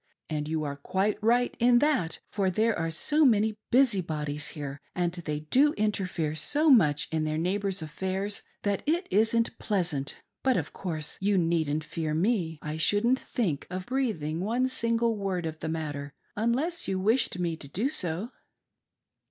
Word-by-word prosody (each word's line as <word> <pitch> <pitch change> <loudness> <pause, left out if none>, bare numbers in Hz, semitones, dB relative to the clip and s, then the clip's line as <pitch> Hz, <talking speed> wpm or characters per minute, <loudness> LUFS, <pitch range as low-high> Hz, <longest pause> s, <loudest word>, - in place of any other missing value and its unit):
And 150 -1 -2
you 155 0 -1
are 140 -1 -4
quite 190 +9 -1
right 240 +3 +2
in 240 0 +5
that, 265 - +1
for 195 -2 +1
there 220 +4 +2
are 165 - -1
so 295 - +2
many 220 -4 +4 0.2
busybodies 165 - +2
here, 145 -1 -6
and 175 -1 0
they 150 -4 -4
do 270 - +3
interfere 185 - -1
so 290 - +2
much 150 - +4
in 160 -1 0
their 155 0 -1
neighbors' 190 +1 -1
affairs 190 +6 -3 0.2
that 200 -1 0
it 340 +4 +1
isn't 225 +3 +2
pleasant. 170 -9 -1 0.3
But, 260 -1 +2
of - - -3
course 155 -5 -3
you 200 0 +2
needn't 160 -3 +1
fear 155 0 -3
me 175 -3 +1
— 150 - -4
/ 155 - -4
shouldn't 230 +9 +3
think 175 - -2
of 185 0 -5
breathing 210 - -1
one 235 +7 +1
single 230 -2 +1
word 190 -4 -2
of 160 -1 -5
the 160 - -4
matter, 145 -3 -4 0.2
unless 260 +11 -1
you 190 -1 -1
wished 220 +1 +2
me 170 -2 -1
to 140 - -10
do 215 - -1
so." 185 - -2
190 Hz, 170 wpm, -28 LUFS, 160-230 Hz, 0.3 s, in